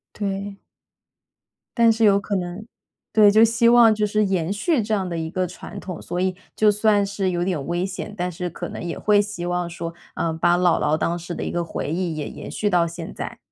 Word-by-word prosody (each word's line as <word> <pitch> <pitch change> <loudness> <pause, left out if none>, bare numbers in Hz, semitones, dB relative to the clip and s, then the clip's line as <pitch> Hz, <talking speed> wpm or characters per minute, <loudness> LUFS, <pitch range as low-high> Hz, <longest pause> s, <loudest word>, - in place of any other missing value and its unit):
对。 200 -1 -4 1.2
但 230 -1 +6
是 225 0 -1
有 200 -1 +5
可 200 0 -3
能， 180 +3 -4 0.5
对， 210 -2 +7
就 220 +2 +6
希 230 +1 +3
望 235 -2 +7
就 210 0 -2
是 210 0 +2
延 185 -2 0
续 240 - +1
这 215 +1 0
样 190 -2 -2
的 170 - -4
一 160 -1 -3
个 185 +1 -1
传 180 - -9
统， 180 -3 -7
所 175 +1 -4
以 185 0 0 0.2
就 215 -1 +4
算 210 -1 +2
是 195 -1 -1
有 175 -1 -1
点 170 -7 -2
危 175 +2 -1
险， 195 +2 -6
但 180 +1 -2
是 175 +1 -4
可 - - -6
能 - - -7
也 170 -1 -4
会 205 -1 +4
希 200 -4 -5
望 175 -1 -1
说， 170 0 -6 0.2
嗯， 165 -1 -1
把 175 +1 +3
姥 175 -2 +3
姥 150 +1 +2
当 170 +2 -1
时 175 +1 -6
的 - - -4
一 - - -3
个 175 0 -1
回 155 -2 -4
忆 170 -2 -2
也 150 - -4
延 - - -9
续 210 - -2
到 175 -3 +3
现 165 0 -7
在。 - - -6
185 Hz, 250 characters per minute, -22 LUFS, 175-210 Hz, 1.2 s, 对